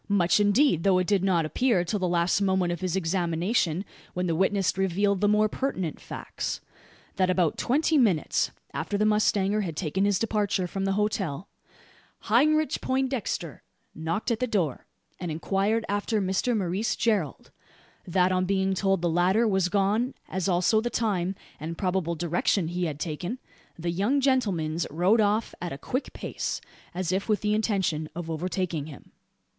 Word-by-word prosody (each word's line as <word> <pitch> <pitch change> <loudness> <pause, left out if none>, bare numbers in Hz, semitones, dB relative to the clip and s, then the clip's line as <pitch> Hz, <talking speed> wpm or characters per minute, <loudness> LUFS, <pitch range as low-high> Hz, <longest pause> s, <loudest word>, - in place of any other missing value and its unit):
Much 190 -1 +3
indeed; 205 - +3
though 190 0 +4
it 185 - +1
did 195 -1 +1
not 175 -4 +2
appear 215 +2 +2
till 205 +4 -2
the 185 - 0
last 175 +3 +2
moment 190 -3 +2
of 175 - -4
his 185 -1 -1
examination, 175 +1 0 0.3
when 180 0 -1
the 170 - 0
witness 190 +1 +1
revealed 190 +1 +1
the 205 - +4
more 210 +1 +4
pertinent 195 - -3
facts: - - -5 0.6
that 185 -1 +2
about 180 -4 +2
twenty 300 +4 +2
minutes 195 - +2 0.2
after 205 - -2
the 210 - +2
mustanger 210 -1 +2
had 165 -6 -4
taken 185 +2 -1
his 200 -1 +3
departure 205 -3 0
from 195 +2 -3
the 195 - +1
hotel, 195 -5 -1 0.7
"Heinrich 305 +7 +3
Poindexter" 260 - -2 0.3
knocked 165 +9 -2
at 225 - 0
the 250 - 0
door, 175 - -1 0.3
and 175 - -4
inquired 195 +7 0
after 205 +2 0
Mr 195 +5 0
Maurice 195 +3 -1
Gerald; 205 -11 -1 0.6
that 180 +1 +2
on 185 0 +1
being 190 0 +1
told 195 -1 +1
the - - +3
latter 180 +7 +3
was 190 -3 +2
gone, 205 +6 +1
as 190 +1 -2
also 185 +5 +3
the 240 - -2
time, 195 -6 -1 0.2
and 165 +3 -5
probable 180 -3 -1
direction 170 +1 0
he 175 +1 -1
had 150 -3 -4
taken, 175 - -4 0.4
the 170 0 -2
"young 205 +11 +1
gentlemans" 195 - +1
rode 180 +9 +3
off 215 +2 +1
a 175 - -3
a 135 - -5
quick 255 - -3
pace, - - -4 0.4
as 185 -1 -1
if 190 +4 -1
with 210 - +2
the 210 0 +1
intention 190 -8 0
of 165 -1 -5
overtaking 170 -2 -2
him. 145 -4 -12
190 Hz, 170 wpm, -27 LUFS, 175-210 Hz, 0.7 s, though